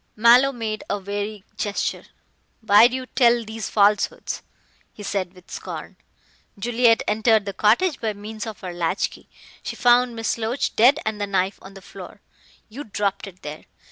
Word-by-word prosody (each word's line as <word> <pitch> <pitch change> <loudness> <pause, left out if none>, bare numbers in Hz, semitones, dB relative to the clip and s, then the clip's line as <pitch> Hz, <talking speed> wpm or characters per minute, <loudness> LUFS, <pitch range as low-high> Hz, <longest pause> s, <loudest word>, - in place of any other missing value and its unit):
Mallow 240 +5 +6
made 220 -4 -4
a 205 - 0
weary 205 +1 -5
gesture. 205 -1 -2 0.6
"Why 220 +1 +7
do 250 - -4
you 260 0 -4
tell 240 -2 +3
these 220 -1 -5
falsehoods?" 205 0 +1 0.5
he 205 - -11
said 190 -2 -3
with 180 -1 -18
scorn. - - -7 0.6
"Juliet 230 +2 +3
entered 220 0 +3
the 200 - -4
cottage 240 - +2
by 220 -2 -1
means 215 +2 -7
of 215 -3 -8
her 180 -2 -6
latch 175 +2 -1
key. - - -16 0.3
She - - -6
found 245 0 +3
Miss 225 +1 -2
Loach 230 +4 -2
dead 255 +6 +6
and 215 -1 -3
the 205 - -1
knife 195 0 -1
on 195 +1 -13
the 195 - -12
floor. 190 +1 -11 0.5
You 255 +7 -8
dropped 200 -1 -2
it 185 -1 -14
there. 150 +1 -8
215 Hz, 175 wpm, -23 LUFS, 200-235 Hz, 0.6 s, Why